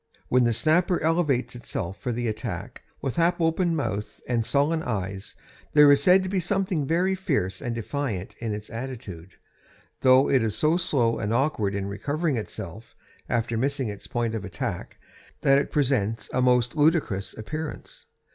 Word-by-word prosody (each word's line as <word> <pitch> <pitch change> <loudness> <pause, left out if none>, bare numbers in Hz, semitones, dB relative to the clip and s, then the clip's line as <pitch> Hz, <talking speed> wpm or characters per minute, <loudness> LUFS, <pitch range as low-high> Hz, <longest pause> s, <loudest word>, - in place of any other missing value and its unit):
When 125 -1 +4
the 120 - +3
snapper 170 - +2
elevates 150 -7 +1
itself 100 -6 -5
for 125 - -3
the 120 0 -2
attack, 110 0 -5 0.2
with 135 +1 -2
half 170 +1 +2
open 165 +1 +1
mouth 110 -8 -3
and 120 -2 +1
sullen 145 +6 +1
eyes, 100 - -4 0.4
there 150 -1 +8
is 140 0 +5
said 185 +4 +5
to - - -3
be 190 0 0
something 180 -4 0
fiery 180 +4 +2 0.5
and 120 -1 -3
defiant 115 -5 -3
in 115 -2 -3
its 105 0 -6
attitude, 110 -8 -7 0.6
though 130 +1 +5
it 130 - +3
is 110 -2 -1
so 155 +2 +3
slow 135 -10 +1
and 105 -1 -2
awkward 115 -6 +1
in 100 -1 -2
recovering 145 - -1
itself 110 -2 -7 0.3
after 115 -1 0
missing 135 -2 0
its 100 -1 -8
point 120 -2 -1
of 110 -3 -3
attack 95 - -5 0.4
that 135 0 +5
it 140 - -3
presents 115 -7 0
a 130 - +2
most 125 0 +3
ludicrous 145 - +1
appearance. 155 +8 -6
125 Hz, 165 wpm, -26 LUFS, 110-155 Hz, 0.6 s, there